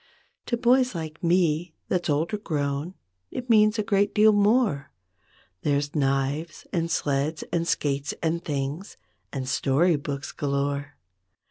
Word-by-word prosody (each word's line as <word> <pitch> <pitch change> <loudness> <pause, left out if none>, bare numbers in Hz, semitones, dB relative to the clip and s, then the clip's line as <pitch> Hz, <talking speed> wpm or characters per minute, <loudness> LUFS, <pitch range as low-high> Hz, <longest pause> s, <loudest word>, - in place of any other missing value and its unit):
To 240 - 0
boys 250 -1 +3
like 160 +1 -6
me, 170 -1 +2
that's 175 -2 -1
older 160 +8 0
grown 145 0 -2 0.3
It 250 -1 -3
means 215 0 +5
a 215 - +1
great 200 0 +1
deal 215 0 +6
more. 205 - +2 0.7
There's 145 0 0
knives 140 +3 -1
and 165 -1 0
sleds 145 0 0
and 170 0 0
skates 140 -2 -1
and 170 +1 0
things 145 +6 -4 0.3
And 130 -2 -4
story 145 +5 +2
books 140 -1 -5
galore. 140 0 -2
160 Hz, 130 wpm, -26 LUFS, 140-195 Hz, 0.7 s, deal